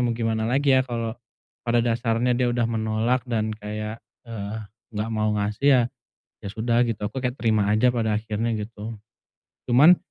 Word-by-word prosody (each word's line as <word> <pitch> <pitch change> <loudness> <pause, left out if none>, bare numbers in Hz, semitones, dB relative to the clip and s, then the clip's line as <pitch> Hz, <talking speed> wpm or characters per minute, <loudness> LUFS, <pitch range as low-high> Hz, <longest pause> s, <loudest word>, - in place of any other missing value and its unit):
mau 120 - +1
gimana 115 -1 -1
lagi 135 +1 +3
ya, 130 - +5
kalau 115 -2 -3 0.5
pada 120 0 +2
dasarnya 115 +1 +1
dia 125 0 +1
udah 120 -1 +1
menolak, 110 +2 0
dan 110 -1 0
kayak, 105 +1 -5 0.2
eee, 110 -1 -5 0.4
nggak 105 +2 -2
mau 110 0 +1
ngasih, 105 +5 -2
ya, 130 -2 +6 0.6
ya 100 - -6
sudah, 115 +2 +1
gitu. 105 -2 -3
Aku 130 +4 -5
kayak, 125 0 -2
terima 110 -3 +2
aja 120 +4 +3
pada 110 -3 +1
akhirnya, 110 +1 -2
gitu. 110 +1 -6 0.7
Cuman, 150 +9 +7
115 Hz, 165 wpm, -24 LUFS, 110-120 Hz, 0.7 s, Cuman